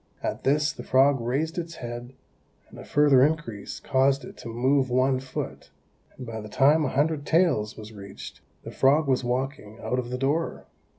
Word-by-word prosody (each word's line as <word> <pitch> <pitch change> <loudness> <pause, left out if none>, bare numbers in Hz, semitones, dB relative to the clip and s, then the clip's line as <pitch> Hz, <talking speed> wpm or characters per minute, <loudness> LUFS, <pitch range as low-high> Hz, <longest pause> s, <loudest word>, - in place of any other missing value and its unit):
At - - -3
this 150 +3 +2
the - - -9
frog 135 0 +3
raised 145 +9 -1
its 165 -1 -6
head, 120 0 -7 0.6
and - - -12
a - - -8
further 145 -3 +4
increase 145 -9 -2
caused 135 +1 +1
it - - -11
to - - -9
move 130 +3 +1
one 130 +1 +2
foot; 130 0 -6 0.5
and 130 - -7
by 110 -1 -6
the 105 - -9
time 145 +7 +4
a - - 0
hundred 145 +2 0
taels 160 -11 +1
was 110 0 -10
reached, 100 -1 -10 0.2
the - - -8
frog 145 +3 +3
was 130 -1 +1
walking 125 -3 -3
out 125 - -2
of 120 -1 -4
the 125 - -3
door. 145 +6 -1
135 Hz, 185 wpm, -26 LUFS, 120-145 Hz, 0.6 s, further